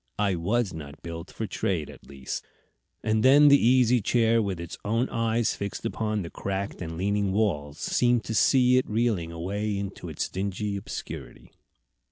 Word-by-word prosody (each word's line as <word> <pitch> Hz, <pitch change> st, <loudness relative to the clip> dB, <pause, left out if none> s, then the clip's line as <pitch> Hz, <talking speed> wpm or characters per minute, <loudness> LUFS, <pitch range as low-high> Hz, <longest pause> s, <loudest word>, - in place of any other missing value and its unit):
I 105 Hz, -2 st, +1 dB
was 100 Hz, +4 st, 0 dB
not 75 Hz, -3 st, -9 dB
built 85 Hz, +1 st, -7 dB
for 110 Hz, -, -4 dB
trade, 90 Hz, -6 st, -2 dB
at -, -, -14 dB
least." 65 Hz, -1 st, -5 dB, 0.6 s
And 110 Hz, 0 st, +1 dB
then 145 Hz, +4 st, +7 dB
the 140 Hz, 0 st, +6 dB
Easy 125 Hz, -1 st, +4 dB
Chair, 115 Hz, +1 st, +3 dB
with 95 Hz, -5 st, -2 dB
its 85 Hz, 0 st, -6 dB
own 115 Hz, +5 st, +1 dB
eyes 115 Hz, 0 st, +1 dB
fixed 100 Hz, -1 st, -5 dB
upon 110 Hz, -2 st, -1 dB
the 85 Hz, -, -8 dB
cracked 100 Hz, 0 st, -4 dB
and 80 Hz, -1 st, -5 dB
leaning 100 Hz, +1 st, 0 dB
walls, 80 Hz, -9 st, 0 dB
seems 120 Hz, -2 st, +2 dB
to 110 Hz, -, -4 dB
see 125 Hz, +2 st, +4 dB
it -, -, -4 dB
reeling 105 Hz, -7 st, 0 dB
away 100 Hz, +5 st, -2 dB
into 100 Hz, -1 st, -5 dB
its -, -, -2 dB
dingy 100 Hz, +2 st, -3 dB
obscurity. 100 Hz, -, -7 dB
100 Hz, 170 wpm, -27 LUFS, 90-115 Hz, 0.6 s, then